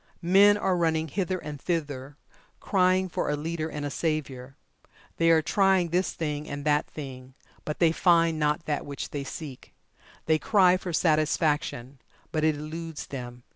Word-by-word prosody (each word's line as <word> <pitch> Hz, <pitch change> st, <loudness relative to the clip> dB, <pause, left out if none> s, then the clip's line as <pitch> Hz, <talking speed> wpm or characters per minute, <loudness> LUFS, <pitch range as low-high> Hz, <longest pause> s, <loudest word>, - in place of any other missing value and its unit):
Men 200 Hz, +4 st, +6 dB
are 190 Hz, -2 st, +1 dB
running 160 Hz, -2 st, 0 dB
hither 185 Hz, +3 st, -1 dB
and 150 Hz, -4 st, -8 dB
thither 145 Hz, -5 st, -3 dB, 0.4 s
crying 185 Hz, -1 st, +2 dB
for 175 Hz, -, -2 dB
a 150 Hz, -, +1 dB
leader 160 Hz, +1 st, -3 dB
and 150 Hz, -2 st, -5 dB
a 145 Hz, -, -3 dB
savior. 135 Hz, -5 st, -3 dB, 0.6 s
They 165 Hz, 0 st, +3 dB
are 160 Hz, -1 st, +5 dB
trying 190 Hz, -1 st, +2 dB
this 180 Hz, +3 st, 0 dB
thing, 150 Hz, -2 st, -4 dB
and 145 Hz, 0 st, -6 dB
that 150 Hz, 0 st, +2 dB
thing, 130 Hz, -3 st, -9 dB, 0.3 s
but 150 Hz, -, -3 dB
they 165 Hz, -2 st, +4 dB
find 165 Hz, -2 st, +3 dB
not 150 Hz, +2 st, 0 dB
that 150 Hz, -2 st, -2 dB
which 140 Hz, -1 st, -6 dB
they 145 Hz, -1 st, -3 dB
seek. 135 Hz, -1 st, -9 dB, 0.5 s
They 155 Hz, 0 st, +2 dB
cry 185 Hz, 0 st, +4 dB
for 185 Hz, -1 st, -6 dB
Satisfaction, 150 Hz, -5 st, 0 dB, 0.3 s
but 155 Hz, -1 st, -1 dB
it 155 Hz, -1 st, +3 dB
eludes 160 Hz, +1 st, -6 dB
them. 125 Hz, -2 st, -8 dB
155 Hz, 165 wpm, -27 LUFS, 145-170 Hz, 0.6 s, Men